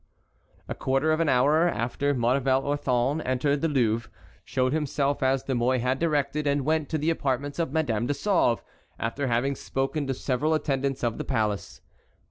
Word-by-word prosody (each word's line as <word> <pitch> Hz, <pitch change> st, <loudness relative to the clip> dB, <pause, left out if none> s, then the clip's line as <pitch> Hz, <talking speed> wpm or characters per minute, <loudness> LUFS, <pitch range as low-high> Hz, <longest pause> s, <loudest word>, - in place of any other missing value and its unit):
A -, -, -3 dB
quarter 135 Hz, +4 st, 0 dB
of 155 Hz, -, +1 dB
an 165 Hz, -3 st, +2 dB
hour 150 Hz, +7 st, +4 dB
after 125 Hz, +4 st, -1 dB
Maurevel 130 Hz, +2 st, +2 dB
Orthon 140 Hz, 0 st, 0 dB
entered 140 Hz, +3 st, 0 dB
the 165 Hz, -, +2 dB
Louvre, 115 Hz, -6 st, 0 dB, 0.3 s
showed 130 Hz, +1 st, 0 dB
himself 145 Hz, -2 st, 0 dB
as 130 Hz, 0 st, +2 dB
De 135 Hz, -, -2 dB
Mouy 125 Hz, +1 st, +2 dB
had 130 Hz, +2 st, 0 dB
directed, 150 Hz, -2 st, 0 dB
and 140 Hz, -1 st, +1 dB
went 155 Hz, -1 st, 0 dB
to 160 Hz, -, 0 dB
the 155 Hz, +2 st, +1 dB
apartments 145 Hz, -1 st, -2 dB
of 165 Hz, -5 st, -1 dB
Madame 120 Hz, -8 st, 0 dB
de 145 Hz, -, 0 dB
Sauve, 175 Hz, -, +1 dB, 0.3 s
after 135 Hz, +5 st, -2 dB
having 125 Hz, +3 st, +1 dB
spoken 135 Hz, +2 st, -2 dB
to 135 Hz, -, -1 dB
several 145 Hz, +5 st, 0 dB
attendants 135 Hz, -3 st, -1 dB
of 115 Hz, -2 st, -1 dB
the -, -, -2 dB
palace. 105 Hz, -2 st, -2 dB
135 Hz, 175 wpm, -26 LUFS, 125-150 Hz, 0.3 s, hour